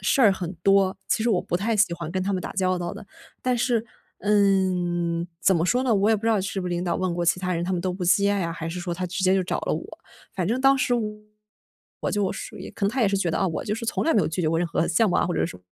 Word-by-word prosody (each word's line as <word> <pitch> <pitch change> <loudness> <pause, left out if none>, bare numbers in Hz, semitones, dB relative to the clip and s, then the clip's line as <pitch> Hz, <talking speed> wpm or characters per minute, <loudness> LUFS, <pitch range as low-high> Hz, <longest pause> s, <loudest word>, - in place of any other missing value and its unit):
事 195 +8 +2
儿 215 -6 +6
很 180 -2 -4
多， 195 -1 +4
其 220 - +1
实 235 - +2
我 185 -5 +2
不 175 - -2
太 220 +4 0
喜 205 -4 +3
欢 170 -2 -6
跟 185 +2 -2
他 200 +2 -1
们 185 - -1
打 - - -5
交 185 -1 +1
道 175 -1 -4
的。 205 0 -10 0.3
但 250 -1 0
是 240 -2 +1 0.3
嗯， 180 -4 +1
怎 190 +5 +4
么 165 -1 +1
说 245 +8 +2
呢， 240 - +3
我 205 +2 +3
也 220 - +4
不 205 - -9
知 - - -2
道 220 -3 +3
是 195 +1 -3
不 180 - -4
是 - - -3
领 175 0 -1
导 180 - -1
问 185 -2 -1
过 175 0 -1
其 170 +1 +2
他 180 0 -2
人 170 - -2
他 180 - -3
们 180 - 0
都 185 +1 -1
不 180 0 -4
接 200 +4 +4
啊， 180 -5 -1
还 165 0 -5
是 175 +2 -5
说 175 0 -3
他 180 +1 -3
直 185 +2 -4
接 185 0 +4
就 190 - +2
找 - - -2
了 - - -2
我。 - - -7 0.4
反 180 -3 -1
正 240 +4 0
当 270 +1 +5
时 255 - 0 1.1
我 - - -1
就 205 -2 0
属 - - -7
于 - - -8
可 200 - -4
能 200 - +2
他 260 - -2
也 220 - +4
是 200 - +1
觉 180 -3 0
得， - - -1
啊， 195 - +1
我 160 - -4
就 210 - -1
是 230 +1 -6
从 - - 0
来 325 - +3
没 210 - +4
有 155 - 0
拒 160 +3 -2
绝 155 - +1
过 165 +1 +1
任 175 - 0
何 165 0 0
项 210 +6 +3
目 180 - +1
啊 - - +2
或 175 - -2
者 - - +1
什 165 - -8
么 90 - -22
185 Hz, 345 characters per minute, -24 LUFS, 175-205 Hz, 1.1 s, 儿